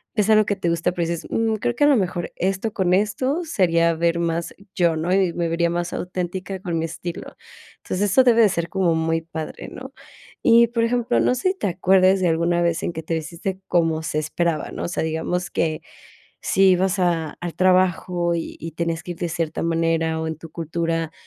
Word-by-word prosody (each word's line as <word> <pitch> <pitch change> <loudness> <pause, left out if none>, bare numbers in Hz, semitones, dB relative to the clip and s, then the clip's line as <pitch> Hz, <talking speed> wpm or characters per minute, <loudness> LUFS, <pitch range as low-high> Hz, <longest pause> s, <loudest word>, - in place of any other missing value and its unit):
es 210 -1 +2
algo 215 -1 +5
que 205 - +1
te 185 -3 -2
gusta, 170 +1 0
pero 175 -2 -2
dices: 170 -1 -4
"Mm, 225 -1 0
creo 240 +3 -1
que 290 - +1
a - - +6
lo 290 - +5
mejor 180 -4 -2
esto 195 +4 -1
con 185 -2 +2
esto 255 - 0
sería 170 - +2
ver 170 +1 +1
más 170 0 -2 0.2
yo, 170 -2 +2
¿no?, 165 +3 -1
y 190 -2 +3
me 170 0 -1
vería 170 +1 +1
más 175 0 -2
auténtica 185 +1 -4
con 175 -3 -3
mi 160 - -1
estilo". 170 +1 -7 0.5
Entonces, 200 +2 -1
eso 260 +7 +5
debe 235 -2 +5
de 215 - +6
ser 170 -2 -2
como 185 -4 +1
muy 165 0 0
padre, 160 -1 -7
¿no? - - -10 0.5
Y, 235 +1 +6
por 230 0 -1
ejemplo, 240 0 +1
no 250 - +2
sé 255 +9 0
si 380 - -9
te - - 0
acuerdes 185 +1 +3
de 180 - +2
alguna 170 +1 +1
vez 170 -1 0
en - - -2
que 160 - -6
te 165 - -3
vestiste 170 +4 -4
como 165 -2 +1
se 155 -1 -3
esperaba, 155 +1 -1
¿no? - - -4
O - - -2
sea, 170 - -2
digamos 160 +3 -2
que 155 -1 -1 0.6
si 195 0 +4
ibas 185 +2 +2
a 170 -4 0
al 175 -1 -5
trabajo 180 -1 +2
y 165 - -4
y 165 0 -7
tenías 165 +1 -2
que 175 - -4
ir 170 - -14
de 175 - -2
cierta 165 -1 -3
manera 165 -1 0
o 160 - -3
en 160 0 -3
tu 165 0 -11
cultura 165 0 -2
175 Hz, 220 wpm, -22 LUFS, 165-190 Hz, 0.6 s, a